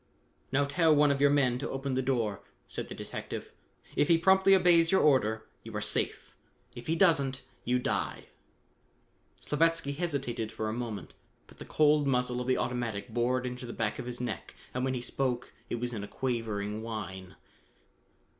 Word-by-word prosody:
"Now 140 +2 +3
tell 160 +2 +3
one 145 0 +5
of 140 0 0
your 145 - +6
men 130 -4 +2
to - - -3
open 135 0 -3
the 130 - +1
door," 120 -6 0 0.3
said - - -5
the - - -6
detective. - - -6 0.4
"If 145 - +3
he 165 - +5
promptly 190 +3 +5
obeys 175 -3 +5
your 190 - +4
order, 110 -6 +3 0.2
you - - -9
are - - 0
safe. - - -1 0.4
If 120 - -9
he 160 - +1
doesn't, 140 -7 +3 0.2
you 125 +1 +2
die." 125 - -2 1.2
Slavatsky 165 -1 +1
hesitated 140 -9 -2
for 110 -1 -3
a - - -2
moment, 115 -3 -5 0.3
but - - -19
the - - -8
cold 150 -1 +3
muzzle 125 -1 +1
of 125 - -5
the 130 - +3
automatic 120 -3 -2
bored 125 +2 0
into 125 0 -5
the 120 - -6
back 110 -2 -2
of - - -5
his 125 0 -4
neck 125 0 -5 0.2
and 125 - -1
when 130 0 0
he 120 - -3
spoke 125 -1 -2 0.2
it - - -1
was 120 +1 -3
in 105 -3 -4
a - - -6
quavering 110 -5 -2
whine. 95 -5 -6
125 Hz, 185 wpm, -30 LUFS, 115-145 Hz, 1.2 s, your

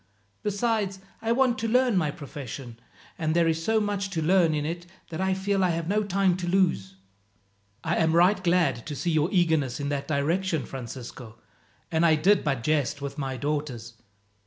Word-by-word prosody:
Besides, 210 -1 0 0.2
I 225 - 0
want 250 0 +2
to 230 - -1
learn 250 0 +3
my 160 -5 +2
profession, 135 -5 -8 0.4
and 155 0 0
there 170 -1 +4
is 165 0 0
so 220 +4 +2
much 205 -2 -1
to 170 -4 -2
learn 170 -2 +4
in 150 -1 -1
it 170 +2 -4 0.2
that 160 +2 -3
I 190 0 +1
feel 195 0 0
I 180 - +3
have 165 -1 -2
no 210 +3 +2
time 195 -2 +2
to 180 -1 -4
lose." 175 - +1 0.9
"I 165 +1 0
am 160 -1 +2
right 185 +3 +4
glad 170 -9 +2
to 150 - -4
see 170 +5 -1
your 155 +1 +2
eagerness 160 -8 +1
in 145 0 -2
that 140 -1 -2
direction, 160 +3 0
Francisco, 120 -2 -8 0.5
and 160 0 +2
I 160 -2 +5
did 185 +6 +3
but 135 -6 -1
jest 150 -1 0
with 140 +1 -6
my 135 -2 -3
daughters. 145 -6 -3
165 Hz, 185 wpm, -26 LUFS, 145-190 Hz, 0.9 s, I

